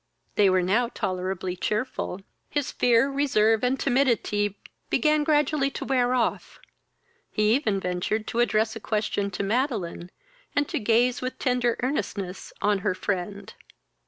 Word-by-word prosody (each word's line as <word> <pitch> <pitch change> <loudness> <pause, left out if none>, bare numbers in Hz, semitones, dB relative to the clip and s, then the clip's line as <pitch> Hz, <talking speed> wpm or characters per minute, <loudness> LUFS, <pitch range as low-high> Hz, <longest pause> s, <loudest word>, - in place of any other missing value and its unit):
They 200 -2 +4
were 185 -1 +3
now 220 +7 +2
tolerably 185 0 -3
cheerful. 210 -1 -2 0.3
His 290 -2 -1
fear, 240 +1 +3
reserve, 225 -6 +2
and 255 +2 +1
timidity, 235 -6 +1 0.3
began 305 -1 +3
gradually 295 -2 +2
to - - -6
wear 255 -2 +2
off. 240 -2 -1 0.7
He 215 0 +2
even 220 -7 +1
ventured 180 +4 -2
to 235 - -2
address 220 -2 +2
a - - -5
question 210 -2 -1
to 200 +1 -4
Madeline, 205 - -1 0.5
and 285 0 +2
to 320 - -1
gaze 235 +2 +2
with 255 0 -4
tender 245 -2 +1
earnestness 200 -8 -3
on 205 -1 +3
her 185 - -1
friend. 200 +1 -4
220 Hz, 140 wpm, -26 LUFS, 200-255 Hz, 0.7 s, They